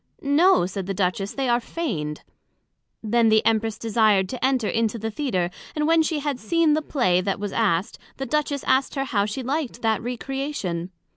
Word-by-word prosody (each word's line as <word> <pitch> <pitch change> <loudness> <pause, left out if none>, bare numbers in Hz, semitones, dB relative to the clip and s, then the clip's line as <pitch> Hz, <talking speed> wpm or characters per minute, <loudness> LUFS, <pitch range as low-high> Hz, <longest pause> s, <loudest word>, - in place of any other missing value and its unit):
No, 290 - +4
said 190 0 -5
the 195 - -2
Duchess, 195 +1 -1
they 270 -1 -1
are 240 0 +3
feigned. 155 - -4 0.8
Then 230 +1 +3
the 220 0 +3
Empress 225 -1 +1
desired 215 -4 +2
to 250 +2 -5
enter 260 -4 +2
into 230 0 0
the 225 0 -4
Theatre; 200 -9 -1 0.2
and 300 -1 0
when 330 0 +5
she 315 -2 -1
had 280 -3 -2
seen 325 +6 +2
the 310 - +1
Play 240 -12 +1
that 195 +1 -2
was 205 -1 -4
asked, 205 -2 0 0.2
the 270 - -3
Duchess 295 -1 -1
asked 265 +3 +1
her 270 - 0
how 205 -6 0
she 235 +5 -4
liked 270 -2 -3
that 220 -1 +1
Recreation? 245 - -4
230 Hz, 190 wpm, -24 LUFS, 200-280 Hz, 0.8 s, when